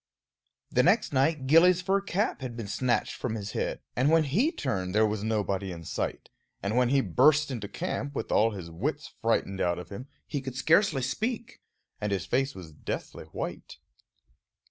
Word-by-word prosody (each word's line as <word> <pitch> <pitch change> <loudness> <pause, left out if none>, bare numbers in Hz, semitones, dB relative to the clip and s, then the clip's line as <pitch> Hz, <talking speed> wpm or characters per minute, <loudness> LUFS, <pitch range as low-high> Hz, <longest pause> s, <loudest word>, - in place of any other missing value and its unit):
The 125 - +4
next 180 - +3
night 135 +1 +2
Gillie's 170 +5 +6
fur 195 +2 +2
cap 200 -3 -1
had 125 -3 -5
been 115 - -4
snatched 120 +4 0
from 115 -3 -3
his 105 -1 -5
head, - - -2
and 130 +4 +3
when 165 0 +5
he 200 - +2
turned 95 - -2
there 110 +1 +5
was 105 -1 -2
nobody 100 -3 -1
in 85 -1 -8
sight; - - -4 0.3
and 100 +3 -1
when 125 -1 +3
he 135 +1 +4
burst 140 - +4
into 110 -5 -4
camp, 140 +7 -4
with - - -3
all 110 +2 +4
his 95 -6 -7
wits 80 - -3
frightened 95 -1 0
out 85 -1 +1
of 90 -1 -8
him, 125 +7 -8 0.2
he 145 -3 -3
could 130 -1 -6
scarcely 155 0 +3
speak, 230 - -3 0.4
and 105 -1 -2
his 95 -2 -1
face 135 +8 0
was 90 -4 -9
deathly 75 - -6
white. 80 - -6
125 Hz, 185 wpm, -28 LUFS, 100-150 Hz, 0.4 s, Gillie's